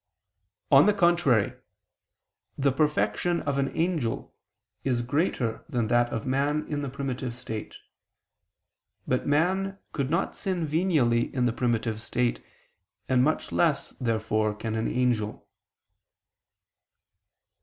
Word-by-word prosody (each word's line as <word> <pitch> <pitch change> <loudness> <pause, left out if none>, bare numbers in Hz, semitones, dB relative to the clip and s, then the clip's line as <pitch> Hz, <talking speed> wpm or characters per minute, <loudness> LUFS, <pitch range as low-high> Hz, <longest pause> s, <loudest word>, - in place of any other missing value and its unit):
On - - +8
the 210 - +4
contrary, 170 - +3 1.0
The 140 0 +2
perfection 155 +4 +1
of 140 -1 -1
an 135 - +1
angel 160 -9 -1 0.5
is 125 -3 0
greater 125 -4 -1
than 115 -3 -1
that 120 0 +3
of 115 - -3
man 145 +3 0
in 145 -1 -2
the 140 - -3
primitive 130 -2 -4
state. 110 -4 -6 1.3
But 130 - 0
man 190 +7 +1 0.2
could 140 -3 -1
not 170 - 0
sin 180 -5 -2
venially 150 -8 +2
in 125 -2 +2
the 120 - +1
primitive 115 -3 -1
state, 120 - -1 0.6
and 125 -1 +3
much 155 +3 0
less, 160 -5 +1
therefore, 110 -3 0
can 110 +1 -4
an 110 0 -1
angel. 120 -4 -1
130 Hz, 120 wpm, -27 LUFS, 120-155 Hz, 1.3 s, On